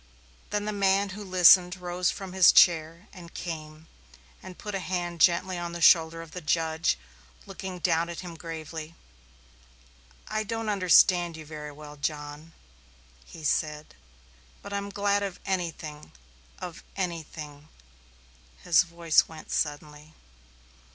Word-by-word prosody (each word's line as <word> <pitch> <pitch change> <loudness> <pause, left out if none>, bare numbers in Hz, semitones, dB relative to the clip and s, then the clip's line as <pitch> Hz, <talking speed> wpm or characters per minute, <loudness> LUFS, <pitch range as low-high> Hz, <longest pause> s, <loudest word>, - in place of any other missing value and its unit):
Then 205 0 -2
the 215 - -2
man 200 0 +2
who 205 +2 -7
listened 180 -1 +6
rose 180 -1 -1
from 190 -2 -6
his 190 -1 +7
chair 165 +2 +4
and 175 -3 -13
came 155 -2 -7 0.6
and 185 -1 -11
put 210 - -7
a 195 - -1
hand 175 -2 -3
gently 180 +1 +3
on 170 0 -5
the 170 - -5
shoulder 165 0 +5
of 165 - -14
the 180 - -7
judge, 160 +1 0 0.5
looking 190 -1 -7
down 170 -1 +1
at 170 - -6
him 175 -2 -8
gravely. 160 -1 -8 1.3
"I 215 - -2
don't 225 0 -3
understand 180 -3 +4
you 155 - -10
very 150 -1 -8
well, 150 0 -12
John," 150 +2 -5 0.7
he 160 - -12
said, 150 0 -1 0.7
"but 200 - -8
I'm 200 0 -3
glad 200 0 +1
of 195 -3 -4
anything 165 -5 -4 0.5
of 175 -1 -8
anything" 155 -5 -6 0.9
his 170 - +5
voice 170 -2 +2
went 160 -1 -11
suddenly. 150 +1 -3
170 Hz, 135 wpm, -27 LUFS, 155-185 Hz, 1.3 s, his